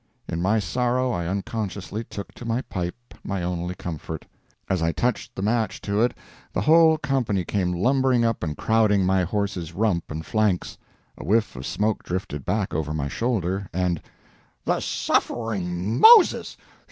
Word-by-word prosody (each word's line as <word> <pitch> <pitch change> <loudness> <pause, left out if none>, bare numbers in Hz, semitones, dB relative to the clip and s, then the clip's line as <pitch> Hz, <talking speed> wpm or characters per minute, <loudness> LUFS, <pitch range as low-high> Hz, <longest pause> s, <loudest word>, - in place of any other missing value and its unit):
In 85 - -3
my 105 +5 +2
sorrow 125 +3 0
I 85 -6 -2
unconsciously 100 +1 -3
took 100 -3 -8
to - - -11
my 115 +1 -1
pipe, 95 +7 -6
my 95 -3 -3
only 90 0 -3
comfort. 80 -2 -6 0.4
As 95 -3 0
I 80 0 +2
touched 120 +3 -2
the 95 - -4
match 110 +1 0
to 100 +1 0
it 120 - +2 0.4
the - - 0
whole 160 - +6
company 130 - 0
came 90 -2 0
lumbering 125 +6 +2
up 115 -2 0
and 75 -4 -3
crowding 105 -4 +3
my 95 0 +3
horse's 95 -3 -2
rump 95 -3 0
and 80 +1 -5
flanks. 105 -5 0 0.4
A - - -6
whiff 110 -1 +1
of 65 +1 -6
smoke 105 +1 0
drifted 90 -6 -4
back 100 0 -1
over 75 0 -2
my 70 -2 -2
shoulder, 100 - -1
and 90 -2 0 0.6
"The - - +1
suffering 100 -4 -1
Moses!" 445 -4 +7
100 Hz, 160 wpm, -24 LUFS, 90-115 Hz, 0.6 s, Moses